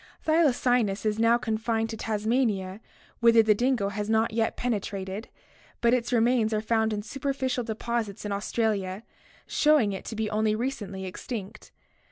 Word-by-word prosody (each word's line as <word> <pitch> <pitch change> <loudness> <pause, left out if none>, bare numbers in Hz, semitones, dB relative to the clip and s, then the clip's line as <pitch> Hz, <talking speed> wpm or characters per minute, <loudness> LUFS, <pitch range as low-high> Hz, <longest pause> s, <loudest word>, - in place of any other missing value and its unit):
Thy 320 +2 +4
lacynus 245 -7 +1
is 215 0 0
now 230 +1 +5
confined 225 0 -1
to - - -4
Tasmania 215 -3 -1 0.4
whither 230 -1 +6
the 215 -1 +5
dingo 240 -2 +1
has 205 +1 -4
not 220 0 +2
yet 225 0 0
penetrated, 200 -3 -3 0.5
but 235 0 +3
its 245 -1 0
remains 230 -2 +2
are - - +1
found 220 0 +1
in 210 -1 -3
superficial 265 0 -2
deposits 225 -2 -3
in 205 - -3
Australia, 200 -1 -1 0.4
showing 295 -9 +3
it 190 - -6
to 225 - -5
be 220 0 -1
only 215 0 +1
recently 215 -6 -4
extinct. 195 +2 -7
220 Hz, 155 wpm, -27 LUFS, 210-240 Hz, 0.5 s, whither